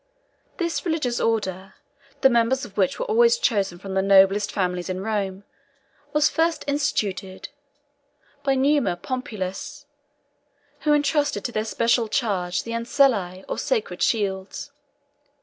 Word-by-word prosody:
This 340 -2 -2
religious 305 -8 -1
order, 195 -4 -1 0.5
the 265 - +7
members 235 +3 +2
of 200 -4 -14
which 190 -3 +1
were - - -2
always 470 +1 +4
chosen 200 - 0
from 195 +1 -7
the 190 - +2
noblest 195 +1 +4
families 180 -2 -2
in 185 +1 -3
Rome, 200 -3 -2 0.7
was 300 +1 +4
first 330 0 0
instituted 205 -10 -2 0.9
by 275 -1 +1
Numa 275 -7 +2
Pompilius, 205 -5 -5 0.9
who 300 - +2
intrusted 290 0 +1
to 245 - -2
their 215 -1 -2
special 230 +1 +1
charge 195 -8 -1
the 230 - -7
Anciliæ, 230 -6 +1
or - - -3
sacred 475 -3 -2
shields. 200 +4 -1
225 Hz, 130 wpm, -24 LUFS, 190-280 Hz, 0.9 s, the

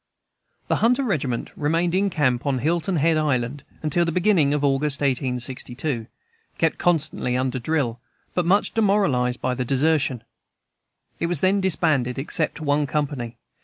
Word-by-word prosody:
The - - +1
"Hunter 250 +4 +2
Regiment" 140 - -2
remained 165 +3 0
in 195 +2 +2
camp 140 -6 0
on 135 -2 +1
Hilton 170 +7 0
Head 160 +1 +2
Island 140 -2 -1 0.2
until 155 +3 +2
the 165 - 0
beginning 175 -4 +3
of 145 0 0
August, 140 +1 +1
1862, 130 -1 -2 0.5
kept 165 -1 0
constantly 155 -7 0
under 130 0 -1
drill, 125 -3 -1 0.3
but 180 - +1
much 200 +3 +2
demoralized 195 - +1
by 130 - 0
desertion. 135 0 +1 1.0
It 170 - 0
was 170 -4 -1
then 195 +1 +3
disbanded, 145 -9 +2
except 155 +4 -1
one 145 -1 +1
company. 135 -4 -3
145 Hz, 140 wpm, -23 LUFS, 130-170 Hz, 1.0 s, beginning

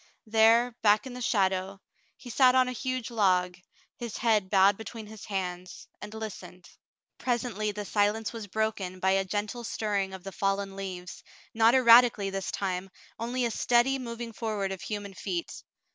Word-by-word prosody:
There, 225 +2 +4
back 210 +1 +4
in 260 - -7
the 250 - -7
shadow, 190 -3 0 0.4
he 245 - -10
sat 255 +1 +5
on 255 -1 +4
a - - -2
huge 255 -1 -3
log, 185 -5 +2 0.4
his 235 -3 -6
head 215 -5 +2
bowed 195 0 +5
between 220 +1 -8
his 215 0 -11
hands, 185 -3 -5
and 210 - -7
listened. 215 -4 -8 0.6
'4t - - -16
Frale's 240 -2 +1
Confession 245 - -4
41 - - -9
Presently 215 0 0
the 210 0 -5
silence 210 +2 0
was 225 -3 -7
broken 200 -3 -2
by 190 +1 +2
a 195 0 +2
gentle 210 +5 -3
stirring 200 -4 -2
of 185 - -11
the 195 - -7
fallen 195 0 -1
leaves, 185 -2 -7 0.3
not 225 +2 +5
erratically 235 -5 +6
this 195 -1 -3
time, 190 -1 -3 0.3
only 245 +2 -1
a 235 - -1
steady 245 +4 +2
moving 235 -2 -6
forward 210 -4 -2
of 190 - -6
human 205 -2 -5
feet. 180 -3 -5
210 Hz, 180 wpm, -28 LUFS, 195-235 Hz, 0.6 s, erratically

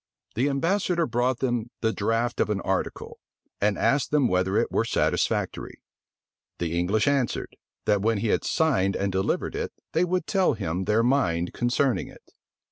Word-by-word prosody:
The 130 +6 +1
ambassador 170 +4 +1
brought 125 -1 0
them 120 -3 -1
the 110 -1 +1
draught 115 +4 -1
of - - +2
an 105 -2 0
article, 95 0 -3 0.4
and 105 0 +2
asked 140 0 +2
them 145 -4 +3
whether 95 0 +1
it - - +1
were - - +2
satisfactory: - - -1 0.7
the 85 -1 -2
English 95 +8 +1
answered, 140 -4 0 0.3
that 105 -2 +2
when 110 +1 +1
he 105 +2 -1
had - - +1
signed 125 - +1
and 100 0 -1
delivered 95 +1 -1
it, - - -3 0.2
they 165 - +2
would 180 -1 0
tell 190 -6 +2
him 95 -3 -3
their 110 +3 +2
mind 90 -10 +1
concerning 125 +1 0
it. - - -17
115 Hz, 165 wpm, -26 LUFS, 100-140 Hz, 0.7 s, them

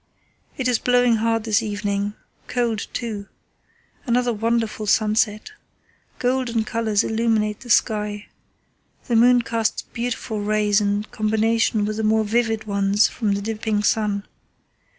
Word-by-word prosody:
"It 260 - -1
is 245 -2 +2
blowing 245 -2 +3
hard 225 0 0
this 220 0 +2
evening, 205 -1 -2 0.3
cold 235 -3 -1
too. 215 -4 -5 0.8
Another 245 0 +1
wonderful 225 -1 -1
sunset. 215 - +1 0.7
Golden 245 -3 0
colours 220 -2 0
illuminate 220 -2 0
the 245 - -12
sky. 210 -3 +1 0.8
The 240 - 0
moon 245 +1 +5
casts 230 -1 -1
beautiful 235 -3 -4
rays 210 0 +2
in 205 0 0
combination 220 0 +1
with 215 0 -3
the 220 - -2
more 220 0 +3
vivid 225 0 0
ones 200 0 +2
from 215 -4 -1
the 200 0 -3
dipping 215 -1 -1
sun. 210 -1 0
220 Hz, 130 wpm, -22 LUFS, 210-230 Hz, 0.8 s, moon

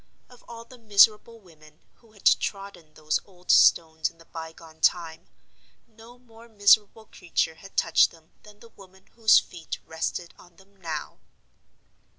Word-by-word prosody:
Of 245 - -19
all 230 0 -11
the 250 +1 -17
miserable 215 +1 +3
women 155 -5 -21 0.2
who 225 -2 -26
had 205 - -21
trodden 195 -6 -1
those 155 0 -2
old 180 -2 -5
stones 160 -1 +3
in 165 - -25
the 165 - -19
bygone 160 -1 -12
time, 165 -2 -1 0.6
no 230 +1 -18
more 235 -1 -19
miserable 210 +1 +2
creature 170 -4 -3
had 195 +5 -17
touched 165 - +3
them 165 -1 -22
than 210 0 -19
the 230 - -16
woman 190 -2 -19
whose 225 -1 +5
feet 165 -3 -4
rested 165 +2 -5
on 175 -1 -20
them 195 +2 -24
now. 165 -6 -7
190 Hz, 155 wpm, -25 LUFS, 160-220 Hz, 0.6 s, whose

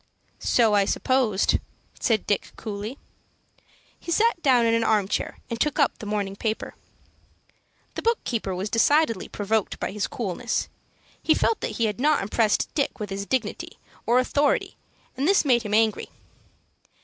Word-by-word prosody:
"So 225 -3 +3
I 200 -1 +4
supposed," 230 -3 +1 0.4
said 220 -4 +1
Dick, 205 - -1
coolly. 215 +4 -6 1.0
He 340 - -7
sat 430 -1 +2
down 250 -5 +4
in 230 - +3
an 230 0 +2
arm 210 -4 +2
chair, - - -2
and 230 -1 -5
took 300 -2 +1
up 285 -5 +2
the 215 - -7
morning 205 -2 -2
paper. 220 +1 -3 1.2
The - - -4
book 465 0 +2
keeper 210 -6 -2
was 195 +3 -4
decidedly 235 -1 +2
provoked 215 0 -1
by - - -2
his 210 +1 -2
coolness. 235 +2 -3 0.5
He 315 - +3
felt 455 - +1
that - - -3
he 230 - +2
had 210 0 -2
not 300 -2 +2
impressed 210 +1 +1
Dick 280 -5 -1
with 210 -2 -5
his 200 +1 -4
dignity 245 -5 -2 0.3
or 240 +2 +4
authority, 280 +3 +1 0.4
and 270 +3 -1
this 390 -4 +4
made 245 -4 +4
him 210 -2 -1
angry. 220 -1 +1
230 Hz, 160 wpm, -25 LUFS, 210-265 Hz, 1.2 s, I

